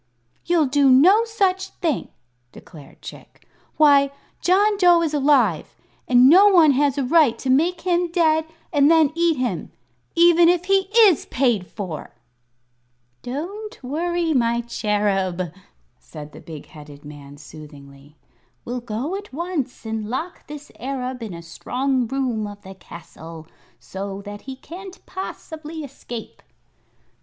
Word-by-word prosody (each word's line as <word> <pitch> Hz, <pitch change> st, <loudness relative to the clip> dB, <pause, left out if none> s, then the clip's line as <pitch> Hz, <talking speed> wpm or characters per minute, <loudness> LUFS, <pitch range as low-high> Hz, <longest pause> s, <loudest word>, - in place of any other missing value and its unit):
"You'll 340 Hz, -3 st, +2 dB
do 280 Hz, 0 st, +3 dB
no 365 Hz, -, +6 dB
such 385 Hz, -4 st, 0 dB
thing," 325 Hz, -7 st, -2 dB, 0.4 s
declared 150 Hz, -4 st, -15 dB
Chick. -, -, -13 dB, 0.3 s
"Why, 285 Hz, -2 st, +5 dB, 0.3 s
John 410 Hz, +4 st, +3 dB
Dough 350 Hz, -3 st, +5 dB
is 310 Hz, -2 st, -2 dB
alive, 270 Hz, -, +2 dB, 0.3 s
and 250 Hz, 0 st, +6 dB
no 375 Hz, +8 st, +7 dB
one 340 Hz, -7 st, +6 dB
has 280 Hz, 0 st, +1 dB
a 280 Hz, -, 0 dB
right 280 Hz, -2 st, +3 dB
to 260 Hz, -, -2 dB
make 335 Hz, +6 st, +1 dB
him 350 Hz, -1 st, 0 dB
dead 320 Hz, -2 st, +2 dB, 0.3 s
and 290 Hz, -1 st, +4 dB
then 320 Hz, -3 st, +4 dB
eat 335 Hz, -2 st, +1 dB
him 240 Hz, -10 st, -3 dB, 0.4 s
even 340 Hz, 0 st, +6 dB
if 355 Hz, 0 st, +1 dB
he 385 Hz, 0 st, +1 dB
is 410 Hz, -9 st, +5 dB
paid 235 Hz, -8 st, 0 dB
for!" 185 Hz, -8 st, -7 dB, 1.1 s
"Don't 360 Hz, -, -7 dB
worry, 335 Hz, +4 st, -1 dB
my 235 Hz, -2 st, +1 dB
Cherub," 195 Hz, -6 st, -1 dB, 0.5 s
said 150 Hz, -1 st, -11 dB
the -, -, -13 dB
big 155 Hz, -3 st, -10 dB
headed 145 Hz, -1 st, -14 dB
man, 145 Hz, -1 st, -12 dB
soothingly; 145 Hz, -1 st, -14 dB, 0.5 s
"we'll 245 Hz, +1 st, -4 dB
go 240 Hz, -, -4 dB
at 410 Hz, +1 st, -8 dB
once 300 Hz, -5 st, -4 dB
and 220 Hz, -1 st, -4 dB
lock 315 Hz, +9 st, -5 dB
this 295 Hz, -1 st, -10 dB
Arab 255 Hz, -1 st, -4 dB
in 215 Hz, -6 st, -6 dB
a 170 Hz, -, -10 dB
strong 250 Hz, +9 st, -2 dB
room 245 Hz, -4 st, -2 dB
of 205 Hz, 0 st, -11 dB
the 190 Hz, 0 st, -10 dB
castle, 165 Hz, -2 st, -12 dB, 0.3 s
so 195 Hz, +10 st, -7 dB
that 205 Hz, 0 st, -9 dB
he 265 Hz, -, -6 dB
can't 365 Hz, +7 st, -11 dB
possibly 320 Hz, -4 st, -7 dB
escape." 240 Hz, -4 st, -9 dB
270 Hz, 140 wpm, -22 LUFS, 205-335 Hz, 1.1 s, no